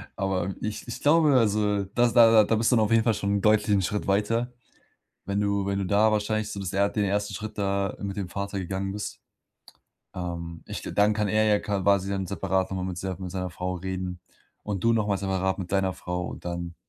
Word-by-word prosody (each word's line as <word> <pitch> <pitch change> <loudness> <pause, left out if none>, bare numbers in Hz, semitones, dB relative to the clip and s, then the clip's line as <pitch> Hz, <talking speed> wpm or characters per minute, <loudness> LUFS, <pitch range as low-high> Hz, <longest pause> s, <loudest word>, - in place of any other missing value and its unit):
aber 95 -1 -1
ich 110 +3 -4
ich 120 - -6
glaube, 155 0 +5
also, 105 -2 +2
das 120 -1 +3
da 115 -2 +7
da 110 - +1
bist 115 +3 +2
du - - +5
dann 110 -2 +4
auf 105 - -3
jeden 115 0 +4
Fall 115 -1 +3
schon 100 -1 -1
deutlich 105 +1 +3
'n 95 - +2
Schritt 105 +3 -2
weiter, 115 +5 +1 0.8
wenn 100 0 0
du 100 -1 0
wenn 100 0 -1
du 100 - -1
da 105 +3 +4
wahrscheinlich 110 0 0
so 105 - -6
das 95 -2 -4
er 100 +1 +2
den 105 0 -1
1. 100 +1 -1
Schritt 105 +3 -7
da 100 -1 -1
mit 100 -1 -4
dem 100 -3 -3
Vater 100 +1 -4
gegangen 95 +1 -3
bist. 105 +1 -6 0.9
Ähm, 85 -2 -5
ich - - -6
dann 105 +1 +2
kann 105 -1 0
er 110 +1 +3
ja 105 -1 +4
quasi 100 -1 +1
dann 95 -1 -2
separat 95 +1 -1
noch 95 - -3
mal 90 - -2
mit 90 -2 -4
ser 95 0 -4
mit 95 -2 -6
seiner 90 0 -3
Frau 90 +1 -4
reden 90 0 -4 0.4
und 100 -2 -4
du 115 - +5
noch 110 -2 +1
mal 100 -1 +1
separat 95 -1 -1
mit 95 -1 -6
deiner 95 -1 +2
Frau. 90 0 -4
Und - - -8
dann, 85 -1 -4
100 Hz, 225 wpm, -26 LUFS, 95-105 Hz, 0.9 s, da